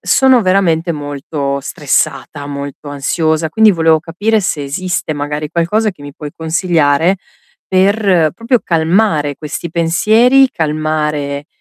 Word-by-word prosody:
sono 265 Hz, -2 st, +4 dB
veramente 180 Hz, -3 st, +1 dB
molto 145 Hz, -1 st, -4 dB
stressata, 145 Hz, 0 st, -2 dB
molto 140 Hz, 0 st, -7 dB
ansiosa, 155 Hz, +3 st, -1 dB
quindi 220 Hz, +5 st, +5 dB
volevo 160 Hz, -3 st, +3 dB
capire 205 Hz, +7 st, 0 dB
se 155 Hz, -6 st, -2 dB
esiste 180 Hz, +3 st, -3 dB
magari 150 Hz, 0 st, -4 dB
qualcosa 210 Hz, +6 st, 0 dB
che 170 Hz, -7 st, -16 dB
mi 145 Hz, -1 st, -10 dB
puoi 150 Hz, -1 st, -8 dB
consigliare 160 Hz, 0 st, +1 dB, 0.6 s
per, 190 Hz, -4 st, +3 dB
proprio 230 Hz, +3 st, 0 dB
calmare 165 Hz, -3 st, +1 dB
questi 155 Hz, +2 st, -6 dB
pensieri, 220 Hz, +11 st, +3 dB
calmare, 150 Hz, -2 st, -2 dB
160 Hz, 120 wpm, -14 LUFS, 145-185 Hz, 0.6 s, quindi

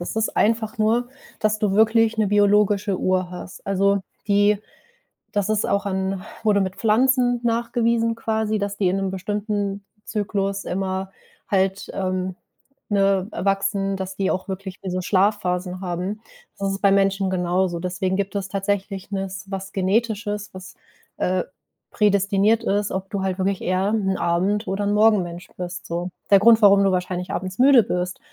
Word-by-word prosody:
Das 175 Hz, -, -5 dB
ist 220 Hz, -, -1 dB
einfach 220 Hz, 0 st, +1 dB
nur, 230 Hz, +3 st, +2 dB, 0.3 s
dass 215 Hz, 0 st, +1 dB
du 210 Hz, -2 st, +1 dB
wirklich 225 Hz, +1 st, +3 dB
'ne 215 Hz, -, +3 dB
biologische 205 Hz, -1 st, +3 dB
Uhr 185 Hz, -1 st, 0 dB
hast. 180 Hz, +1 st, -10 dB
Also 195 Hz, +1 st, +2 dB, 0.3 s
die 205 Hz, +1 st, +4 dB, 0.7 s
das 205 Hz, 0 st, -1 dB
ist 215 Hz, -1 st, +1 dB
auch 200 Hz, 0 st, 0 dB
an 190 Hz, -1 st, -2 dB, 0.2 s
wurde 205 Hz, -2 st, +3 dB
mit 190 Hz, 0 st, -2 dB
Pflanzen 245 Hz, +2 st, +3 dB
nachgewiesen 230 Hz, 0 st, +1 dB
quasi, 220 Hz, -1 st, -1 dB
dass 200 Hz, 0 st, -3 dB
die 195 Hz, -3 st, +2 dB
in 185 Hz, -, 0 dB
'nem 195 Hz, -1 st, -1 dB
bestimmten 205 Hz, +1 st, -3 dB, 0.2 s
Zyklus 200 Hz, -2 st, -2 dB
immer 190 Hz, +1 st, -3 dB, 0.4 s
halt, 195 Hz, -1 st, 0 dB
ähm, 185 Hz, -1 st, -2 dB, 0.5 s
ne, 195 Hz, -2 st, +2 dB
äh, -, -, -5 dB
wachsen, 195 Hz, 0 st, 0 dB
dass 190 Hz, 0 st, -5 dB
die 190 Hz, -1 st, 0 dB
auch 185 Hz, -, -3 dB
wirklich 190 Hz, 0 st, -6 dB
wie 190 Hz, -, -5 dB
so 185 Hz, 0 st, -2 dB
Schlafphasen 185 Hz, -1 st, 0 dB
haben. 185 Hz, +4 st, -3 dB, 0.4 s
Das 195 Hz, 0 st, -1 dB
ist 195 Hz, -, -4 dB
bei 200 Hz, -1 st, +4 dB
Menschen 195 Hz, -1 st, +2 dB
genauso. 180 Hz, -1 st, 0 dB
Deswegen 185 Hz, +1 st, -2 dB
gibt 200 Hz, 0 st, -2 dB
es 195 Hz, -1 st, -2 dB
tatsächlich 195 Hz, 0 st, -3 dB
nes 195 Hz, 0 st, -4 dB
was 195 Hz, 0 st, -5 dB
Genetisches, 210 Hz, +1 st, -1 dB
was, 185 Hz, 0 st, -10 dB, 0.4 s
äh, 185 Hz, 0 st, 0 dB, 0.5 s
prädestiniert 205 Hz, +2 st, +2 dB
ist, 205 Hz, -2 st, 0 dB
ob 190 Hz, 0 st, -4 dB
du 200 Hz, -2 st, -3 dB
halt 190 Hz, -1 st, -1 dB
wirklich 190 Hz, 0 st, 0 dB
eher 185 Hz, +2 st, 0 dB
'n 195 Hz, -3 st, 0 dB
Abend 185 Hz, +6 st, 0 dB
oder 195 Hz, +2 st, -1 dB
'n 205 Hz, -, +1 dB
Morgenmensch 190 Hz, -5 st, +2 dB
bist, 180 Hz, 0 st, -6 dB
so. 175 Hz, +2 st, -3 dB, 0.2 s
Der 200 Hz, -, +7 dB
Grund, 225 Hz, +2 st, +6 dB
warum 200 Hz, -1 st, +7 dB
du 195 Hz, -, +3 dB
wahrscheinlich 180 Hz, 0 st, -2 dB
abends 185 Hz, 0 st, -4 dB
müde 260 Hz, -2 st, +7 dB
bist, 180 Hz, -1 st, -3 dB
195 Hz, 165 wpm, -22 LUFS, 185-210 Hz, 0.7 s, Der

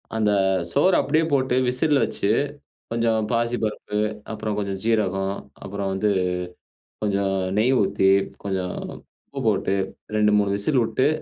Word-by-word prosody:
அந்த 110 Hz, -2 st, +2 dB, 0.4 s
சோறு 185 Hz, -1 st, +4 dB
அப்பிடியே 155 Hz, +3 st, +2 dB
போட்டு 130 Hz, -2 st, +2 dB
விசில்ல 140 Hz, +4 st, +2 dB
வச்சு, 100 Hz, -, -2 dB, 0.6 s
கொஞ்சம் 115 Hz, -2 st, +1 dB
பாசிப்பருப்பு, 115 Hz, -3 st, -1 dB, 0.3 s
அப்பறம் 110 Hz, -1 st, -3 dB
கொஞ்சம் 100 Hz, -2 st, -3 dB
சீரகம், 100 Hz, -3 st, +1 dB, 0.3 s
அப்புறம் 100 Hz, 0 st, -3 dB
வந்து 100 Hz, +2 st, +1 dB, 0.9 s
கொஞ்சம் 100 Hz, -2 st, 0 dB, 0.2 s
நெய் 125 Hz, +5 st, +3 dB
ஊத்தி, 95 Hz, 0 st, +2 dB, 0.4 s
கொஞ்சம் 95 Hz, -2 st, -2 dB, 0.5 s
உப்பு 140 Hz, -, -6 dB
போட்டு 100 Hz, -2 st, +1 dB, 0.4 s
2, 105 Hz, 0 st, +3 dB
3 100 Hz, -1 st, +1 dB
விசிலு 115 Hz, +8 st, +1 dB
விட்டு, 130 Hz, -, +1 dB
105 Hz, 125 wpm, -23 LUFS, 100-120 Hz, 0.9 s, சோறு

